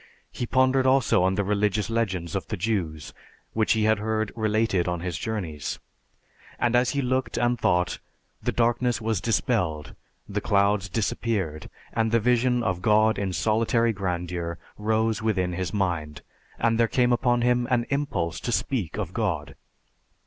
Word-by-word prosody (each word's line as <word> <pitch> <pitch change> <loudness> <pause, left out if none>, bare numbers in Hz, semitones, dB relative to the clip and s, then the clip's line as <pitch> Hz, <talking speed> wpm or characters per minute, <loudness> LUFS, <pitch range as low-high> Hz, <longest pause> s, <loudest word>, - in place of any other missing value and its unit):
He 120 - -4
pondered 130 +1 +3
also 130 -7 +4
on 95 +1 +2
the 100 - +1
religious 105 +1 0
legends 100 -6 -2
of 95 - -3
the 110 - -3
Jews, 85 -7 -2 0.4
which 110 -1 +2
he 110 -1 +1
had 110 -1 +3
heard 110 -1 -1
related 110 -4 +1
on 90 -1 -2
his 90 -1 -3
journeys; 85 -6 -4 0.8
and 120 0 +1
as 125 0 +3
he 140 - +1
looked 130 +1 -1
and 120 0 +1
thought, 90 -4 +1 0.4
the - - 0
darkness 120 +1 +1
was 110 -4 -1
dispelled, 90 -8 0 0.3
the 105 0 -3
clouds 100 -1 +2
disappeared, 100 -6 -2 0.2
and 115 -1 +1
the 115 - +4
vision 125 +1 +2
of 95 -5 -1
God 110 +1 +3
in 100 -2 -1
solitary 115 +3 +1
grandeur 90 -3 -3 0.2
rose 110 +1 0
within 95 -5 0
his 90 0 -3
mind, 85 -7 -2 0.3
and 115 0 +1
there 115 - +4
came 125 +1 +2
upon 120 0 +2
him 125 0 +2
an 120 -2 +2
impulse 115 - -1
to 120 - -3
speak 110 - -1
of 95 -5 -4
God. 80 -11 -2
110 Hz, 160 wpm, -25 LUFS, 90-115 Hz, 0.8 s, also